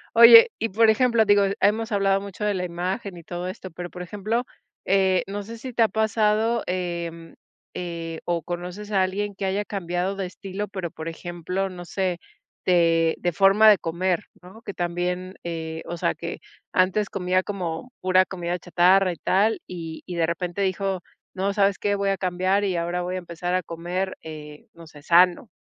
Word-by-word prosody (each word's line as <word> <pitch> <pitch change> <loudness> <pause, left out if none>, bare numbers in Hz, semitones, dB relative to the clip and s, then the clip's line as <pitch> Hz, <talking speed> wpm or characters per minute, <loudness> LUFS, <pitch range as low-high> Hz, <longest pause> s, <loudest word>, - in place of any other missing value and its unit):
Oye, 230 0 +10
y 225 - -1
por 220 +3 +4
ejemplo, 235 0 +3
digo, 205 -1 +5 0.2
hemos 220 +3 +2
hablado 195 -1 +2
mucho 200 +1 -6
de 210 - +1
la 185 -2 -2
imagen 180 +2 -4
y 170 - -11
todo 175 +2 -5
esto, 185 0 -7
pero 175 +2 -7
por 180 0 -7
ejemplo, 210 +6 -2 0.4
eh, 190 -1 +3
no 200 +1 -4
sé, 230 +3 -9
si 255 +2 -8
te 230 - +4
ha 225 - +4
pasado, 220 +2 +1
eh 170 -2 -4 0.4
eh, 165 -2 -5
o 170 -2 -1
conoces 180 +5 -6
a 195 -2 +3
alguien 200 +2 -1
que 195 0 -4
haya 195 +2 -1
cambiado 185 -1 -2
de 195 -1 -3
estilo, 195 +2 -6
pero 185 -4 -5
por 160 -2 -7
ejemplo, 175 +3 -4
no 180 -1 -8
sé, 185 -1 -2 0.5
de 165 -2 +3
de 175 - 0
forma 195 +5 +5
de 205 -4 +6
comer, 180 +4 -1 0.2
¿no?, 190 +6 -13
que 200 - -7
también, 180 +1 -2
eh, 160 -1 -5
o 175 - -4
sea, 85 - 0
que - - -6 0.3
antes 190 +3 +2
comía 185 -1 0
como 185 +3 -5
pura 185 0 +4
comida 175 -1 -4
chatarra 180 +2 +4
y - - -5
tal, 210 +7 +2
y 165 -3 -7
y 180 - -6
de 165 -1 +1
repente 175 +3 -3
dijo: 195 0 0 0.3
"No, 195 +1 -1
¿sabes 200 -1 +2
qué? 205 0 +1
Voy 200 0 0
a 195 - 0
cambiar 185 +2 0
y 190 -2 0
ahora 175 +1 -1
voy 180 +1 -3
a - - -2
empezar 175 0 -3
a 185 - 0
comer, 175 +4 -3
eh, 150 -1 -10
no 165 0 -12
sé, 150 -2 -14
sano". 175 +7 +4
185 Hz, 190 wpm, -24 LUFS, 175-200 Hz, 0.5 s, Oye